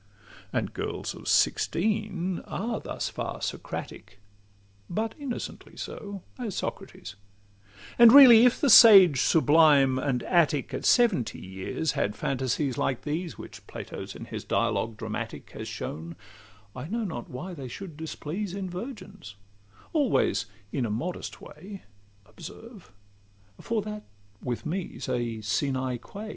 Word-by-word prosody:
And - - -2
girls - - -4
of - - -11
sixteen 190 -2 +1
are 225 +3 -3
thus - - -4
far - - -5
Socratic, 100 - -6 0.7
But 220 +5 -2
innocently 270 -5 -6
so, 200 -2 -7 0.2
as 225 -6 -4
Socrates; 100 - -6 0.9
And 235 -1 +10
really, 250 -4 +10
if 245 -1 +4
the 285 -5 +3
sage 195 - +9
sublime 145 -4 +4
and 130 -3 -1
Attic 155 -6 +1
At - - -4
seventy 190 - +3
years 95 +11 -3
had 105 - -1
phantasies 130 0 -1
like 130 - -1
these, 160 +3 -4
Which - - -11
Plato - - -7
in - - -8
his - - -7
dialogues 115 -1 -1
dramatic 110 -1 -6
Has - - -7
shown, 80 +2 -6 0.6
I 125 +3 -6
know 230 +5 -2
not 160 - -5
why 180 +9 -7
they 140 -6 -7
should 165 +6 -8
displease 160 +5 -5
In 190 -2 -5
virgins—always 105 - -3 0.2
in 135 - -1
a 115 - -1
modest 160 +13 -4
way, 190 +6 -11 0.4
Observe; 200 - -12 0.7
for 225 -3 -2
that 210 0 -6 0.4
with 120 -2 -4
me 175 +3 -4
's - - -6
a 115 -2 -2
'sine 130 +3 -1
qua. 210 - -9
160 Hz, 130 wpm, -27 LUFS, -, 0.9 s, And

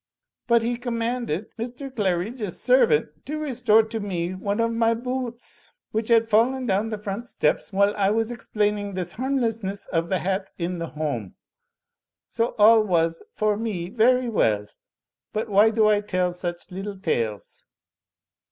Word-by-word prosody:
But 235 -1 +4
he 240 +1 -1
commanded 235 -5 -3
Mr. 250 +4 -5
Qaridge's 200 0 -1
servant 160 - +3
to 305 +2 -3
restore 245 -7 +3
to 220 +1 -4
me 180 -4 -3
one 200 +3 -2
of 230 0 +2
my 230 0 +2
boo 250 +2 -2
oots, 235 +1 -10 0.2
which 220 0 -1
had 230 -1 +4
fallen 245 +4 +2
down 210 0 +1
the 215 - -3
front 210 +3 -5
steps, - - 0
whUe 200 +1 +2
I 200 -2 +1
was 225 +2 0
explaining 210 -4 -1
this 180 -2 -3
harm 265 +6 -1
lessness 220 -5 -2
of 165 0 0
the 190 - +2
hat 190 +3 -2
in 175 0 -3
the 165 - -3
home. 145 - -4 0.9
So 230 +1 -1
all 220 +1 +7
was, 165 -5 +1
for 215 -1 +1
me, 205 -6 -3
very 245 +3 +3
well. 105 - +1 0.7
But 215 +1 -2
why 205 +2 +5
do 220 -1 +2
I 210 -1 +3
tell 185 -3 0
such 175 +1 -5
little 195 +2 -5
tales?" 110 - -3
210 Hz, 160 wpm, -24 LUFS, 185-230 Hz, 0.9 s, all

